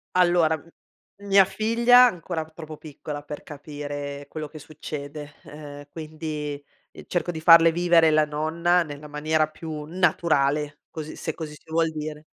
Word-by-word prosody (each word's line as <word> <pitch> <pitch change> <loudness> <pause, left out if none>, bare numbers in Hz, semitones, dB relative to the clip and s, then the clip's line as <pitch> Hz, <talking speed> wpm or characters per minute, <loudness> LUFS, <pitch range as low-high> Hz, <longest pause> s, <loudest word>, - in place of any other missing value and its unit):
Allora, 175 -3 +4
m 155 - -19 0.6
mia 195 -1 +6
figlia 235 +5 +5
è 240 - +1
ancora 170 -2 -4
p 160 - -18
troppo 155 -1 -9
piccola 150 -1 -7
per 150 0 -8
capire, 145 -1 -6
ehm, - - -19
quello 155 0 -6
che 155 - -10
succede, 150 -1 -8
ehm, 145 -1 -10
quindi, 155 -2 -5 0.3
ehm, - - -12
cerco 175 0 -1
di 160 - -6
farle 165 0 +8
vivere 170 -1 +4
la 155 0 +4
nonna 165 +4 +1
nella 150 -1 -9
maniera 155 +1 +1
più 155 -1 -7
naturale 150 -4 +1
così 155 -1 -7
se 160 - -4
così 155 -1 -7
si 150 - -16
vuol 165 0 +2
dire. 150 0 -6
155 Hz, 165 wpm, -25 LUFS, 150-165 Hz, 0.6 s, farle